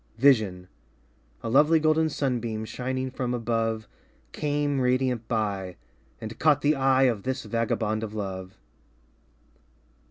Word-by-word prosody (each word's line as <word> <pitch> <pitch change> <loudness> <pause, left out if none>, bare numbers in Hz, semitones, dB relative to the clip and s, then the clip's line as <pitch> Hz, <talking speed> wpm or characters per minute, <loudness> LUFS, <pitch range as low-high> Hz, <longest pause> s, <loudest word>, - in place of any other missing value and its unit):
Vision 110 -9 +3 0.8
A - - -2
lovely 150 +5 +5
golden 155 +1 +2
sunbeam 120 -6 -2
Shining 130 +2 -3
from 125 -1 -2
above 115 -2 -1 0.4
Came 145 - -1
radiant 125 -2 +1
by 100 -5 -2 0.4
And 110 0 -8
caught 150 -2 +4
the 150 +1 +3
eye 135 -1 +3
Of 120 -6 +2
this 130 +3 -3
vagabond 110 -2 -1
of 110 -1 -5
love. 95 -2 -5
120 Hz, 120 wpm, -26 LUFS, 110-135 Hz, 0.8 s, lovely